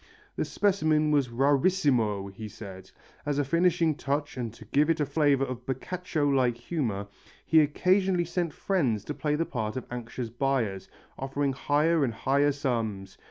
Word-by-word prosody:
The - - -1
specimen 155 -7 +2
was 145 -3 +3
rarissimo, 130 - +2
he 110 +2 -7
said. 95 -2 -10 0.3
As 145 -1 -1
a 145 - +2
finishing 170 +1 +2
touch 145 +1 -2
and 120 -3 -4
to 110 - -13
give 145 +8 +2
it 165 -1 +2
a 150 - +2
flavour 140 -1 +2
of 125 -2 -6
Boccaccio 155 +3 -2
like 130 -4 +2
humour, 115 - -3 0.4
he 160 - +5
occasionally 180 +4 +2
sent 170 -1 -2
friends 135 - 0
to 150 - -4
play 150 0 -1
the 165 +2 0
part 110 -4 -3
of 130 - -5
anxious 120 -1 -5
buyers, 120 -7 -1 0.3
offering 135 +1 -1
higher 150 +4 +2
and 120 -4 -1
higher 140 +5 +2
sums. 110 -9 -3
140 Hz, 160 wpm, -28 LUFS, 120-155 Hz, 0.4 s, he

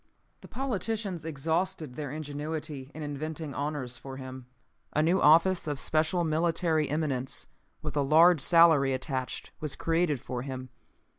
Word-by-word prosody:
"The - - -13
politicians 220 - -3
exhausted 160 0 -1
their 145 0 -5
ingenuity 150 -1 -5
in 155 - -6
inventing 150 +1 -5
honors 140 -4 -3
for 135 +1 -8
him. 130 -1 -8 0.5
A 150 - +2
new 175 +4 +2
office 165 +4 +5
of 145 -2 -1
special 155 +5 +1
military 160 -1 +1
eminence, 140 -4 -1 0.4
with - - -4
a 145 - +2
large 160 +3 +6
salary 160 -4 +5
attached, 130 -1 -4
was 150 -2 -3
created 165 -4 +1
for 125 +1 -5
him. 130 -1 -6
155 Hz, 140 wpm, -29 LUFS, 135-165 Hz, 0.5 s, large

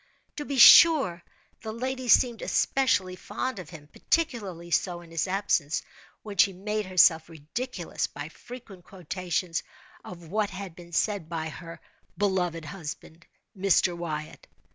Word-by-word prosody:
To 295 - -4
be 280 -1 -4
sure, 260 - +8 0.4
the 220 - -5
lady 255 +2 -4
seemed 240 0 +4
especially 205 -9 +1
fond 255 +4 -5
of 175 -4 -9
him—particularly 180 - -3
so 175 0 0
in 170 -1 -16
his 165 +3 -1
absence—when 195 +2 -3
she 195 +1 +4
made 210 +2 -3
herself 170 -3 +4
ridiculous 170 - -4
by 145 +2 -8
frequent 220 -2 -12
quotations 180 -1 -3 0.4
of 170 -2 -11
what 210 +2 0
had 190 -3 -8
been 175 -1 -13
said 190 -1 -1
by 160 -2 -3
her 165 +2 -10 0.4
"beloved 180 -4 -1
husband, 160 0 -9 0.3
Mr. 185 -2 +2
Wyatt." 155 -3 -6
185 Hz, 130 wpm, -27 LUFS, 165-215 Hz, 0.4 s, sure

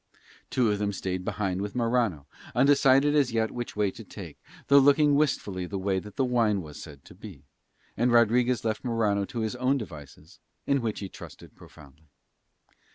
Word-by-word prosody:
Two 120 -4 +1
of 105 - -1
them 105 -1 -1
stayed 95 -1 -4
behind 95 -2 -2
with 100 +2 -5
Morano, 115 - 0 0.3
undecided 135 +2 +4
as 140 -4 +2
yet 110 -1 0
which 120 -1 -6
way 105 -2 +1
to - - -11
take, - - -11 0.3
though 140 0 +6
looking 145 +1 +4
wistfully 105 -11 0
the 100 - -4
way 95 0 -1
that 105 +1 -12
that - - +1
wine 115 -6 +1
was 75 -2 -10
said 70 -4 -12
to - - -14
be; - - -12 0.5
and 120 +2 +1
Rodriguez 120 +1 +3
left 110 -1 -2
Morano 110 -5 0
to 115 +3 -5
his 110 +2 -2
own 130 +2 +1
devices, 80 - -11 0.3
in 140 -1 +1
which 110 -3 -3
he 100 - -4
trusted - - -13
profoundly. 75 +1 -17
110 Hz, 180 wpm, -27 LUFS, 95-125 Hz, 0.5 s, though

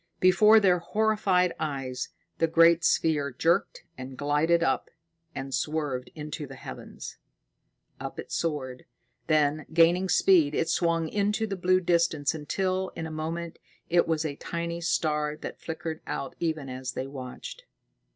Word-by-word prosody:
Before 210 +4 +6
their 185 -4 +3
horrified 195 -2 +1
eyes, 135 -4 -3 0.3
the 165 - +3
great 165 +1 +5
sphere 155 -4 +2
jerked 165 +8 0 0.2
and 130 0 -8
glided 150 +4 +2
up, 135 - 0 0.5
and 135 0 -5
swerved 145 -5 -2
into 150 -1 -6
the - - -10
heavens. - - -9 0.8
Up - - -6
it - - -8
soared; 135 -6 -3 0.4
then, 155 -1 +2
gaining 170 +3 +4
speed, 160 -4 +4
it 165 - 0
swung 165 -1 +1
into 210 +4 0
the 200 -2 -3
blue 185 0 +2
distance 170 -5 +1
until, 185 +5 -1
in 165 - -4
a 160 - -6
moment, 165 +2 -4 0.3
it 175 0 +4
was 160 -1 0
a 145 -2 -3
tiny 170 0 -4
star 150 -3 0
that - - -8
flickered 160 -1 -5
out 135 - -4
even 160 -4 -2
as 130 0 -5
they 130 - -3
watched. 135 - -8
160 Hz, 145 wpm, -27 LUFS, 145-175 Hz, 0.8 s, Before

